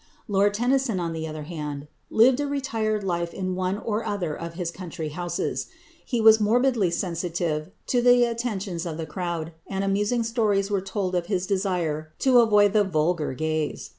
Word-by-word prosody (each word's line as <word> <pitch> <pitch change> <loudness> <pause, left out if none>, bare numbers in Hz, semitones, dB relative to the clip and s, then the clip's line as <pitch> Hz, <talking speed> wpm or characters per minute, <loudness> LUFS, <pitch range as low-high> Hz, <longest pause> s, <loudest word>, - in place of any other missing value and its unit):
Lord 205 0 +2
Tennyson, 245 -2 +1
on 170 -1 -2
the 160 0 -4
other 155 -1 -6
hand, 150 -3 -6 0.2
lived 245 +4 +5
a 290 - 0
retired 225 -7 -1
life 170 -2 -2
in 185 -1 -2
one 185 +1 -1
or 220 0 -2
other 185 -8 -2
of 170 0 -7
his 175 -2 -3
country 165 -3 -6
houses. 175 +3 -3 0.4
He 240 - -2
was 220 0 +7
morbidly 230 -2 +3
sensitive 170 -2 -2 0.2
to 245 - +1
the 245 0 +6
attentions 210 -7 -2
of 160 -2 -4
the 165 - -4
crowd, 170 -1 -4 0.2
and 195 0 -2
amusing 205 +4 +1
stories 210 -4 +1
are 200 -2 +1
told 190 -1 -3
of 175 -1 -1
his 190 -3 0
desire 175 -6 -1
to 255 -2 +5
avoid 210 -3 +5
the 210 -1 +5
"vulgar" 160 -5 0
gaze. 155 +1 -2
190 Hz, 175 wpm, -25 LUFS, 170-220 Hz, 0.4 s, was